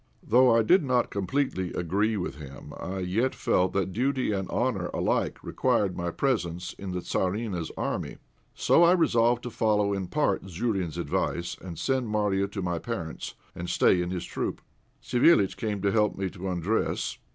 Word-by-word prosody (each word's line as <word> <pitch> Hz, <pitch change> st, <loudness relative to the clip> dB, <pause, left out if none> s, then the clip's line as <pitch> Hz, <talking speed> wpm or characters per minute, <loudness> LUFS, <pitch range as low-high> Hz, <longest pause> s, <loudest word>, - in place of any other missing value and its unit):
Though 125 Hz, +1 st, +6 dB
I 115 Hz, -, +4 dB
did 180 Hz, -, +5 dB
not 125 Hz, -3 st, +1 dB
completely 100 Hz, -3 st, -1 dB
agree 100 Hz, +6 st, 0 dB
with 90 Hz, -6 st, -4 dB
him, 70 Hz, -3 st, -10 dB
I 95 Hz, +1 st, -5 dB
yet 110 Hz, +9 st, 0 dB
felt 90 Hz, +1 st, +1 dB
that 95 Hz, -1 st, -1 dB
duty 130 Hz, +2 st, 0 dB
and 95 Hz, -2 st, -2 dB
honour 110 Hz, -8 st, 0 dB
alike -, -, 0 dB
required 100 Hz, -3 st, +1 dB
my 85 Hz, 0 st, -2 dB
presence 90 Hz, -7 st, -1 dB
in 100 Hz, -, -7 dB
the 90 Hz, 0 st, -3 dB
Tzarina's 95 Hz, -2 st, -2 dB
army; -, -, -3 dB, 0.4 s
so -, -, +4 dB
I 170 Hz, +1 st, +7 dB
resolved 120 Hz, -8 st, +3 dB
to 120 Hz, -, -5 dB
follow 105 Hz, -3 st, +2 dB
in 95 Hz, -2 st, -3 dB
part 145 Hz, -5 st, +1 dB
Zourine's 95 Hz, -3 st, -2 dB
advice, 85 Hz, +1 st, -1 dB
and 85 Hz, -3 st, -8 dB
send 130 Hz, -, 0 dB
Marya 105 Hz, -2 st, +1 dB
to 100 Hz, -1 st, -5 dB
my 85 Hz, -2 st, -1 dB
parents, 85 Hz, -9 st, -5 dB, 0.2 s
and 85 Hz, 0 st, -6 dB
stay 90 Hz, -, +4 dB
in 90 Hz, -, -2 dB
his 90 Hz, -1 st, -3 dB
troop. -, -, -4 dB, 0.4 s
Savéliitch 120 Hz, -, +4 dB
came 105 Hz, -4 st, -3 dB
to 100 Hz, -, +3 dB
help 105 Hz, -1 st, +2 dB
me 95 Hz, -1 st, -2 dB
to 95 Hz, 0 st, -6 dB
undress. 90 Hz, +5 st, -1 dB
100 Hz, 175 wpm, -27 LUFS, 90-120 Hz, 0.4 s, I